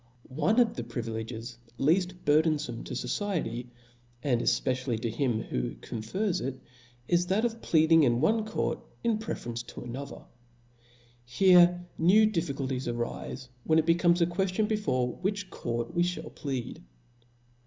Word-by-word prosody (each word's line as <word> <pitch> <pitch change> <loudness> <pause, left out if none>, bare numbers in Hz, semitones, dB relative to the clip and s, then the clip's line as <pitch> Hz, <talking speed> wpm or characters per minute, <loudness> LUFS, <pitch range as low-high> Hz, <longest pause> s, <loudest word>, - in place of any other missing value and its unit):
One 155 - +2
of 235 -2 +3
the 120 - -4
privileges 115 0 -5 0.2
leaft 180 +6 +1
burthenfome 150 -5 +2
to - - -5
fociety, 170 - -2 0.6
and 125 -5 +1
efpecially 125 -1 0
to 115 0 -2
him 115 -2 0
who - - -3
confers 170 - -3
it, 130 0 -4 0.5
is 175 0 +2
that 200 +5 +2
of 230 -1 -3
plead 160 0 +3
ing 165 0 +8
in 120 -4 +3
one 220 - +2
court 220 - -2 0.4
preferably 120 - -4
to - - -9
another. 130 +4 -7 1.0
Here 175 +7 +5
new 195 +7 +6
difficulties 140 - -2
arife, 120 +2 -4 0.2
when 160 - +3
it 160 - +3
becomes 170 +1 +3
a - - +6
queftion 190 +4 0
be 220 - +1
fore 125 - -1
which 195 0 -3
court 120 +7 -3
we 175 - +1
ihall 180 +1 -2
plead. 135 -5 -4
150 Hz, 145 wpm, -29 LUFS, 120-180 Hz, 1.0 s, ing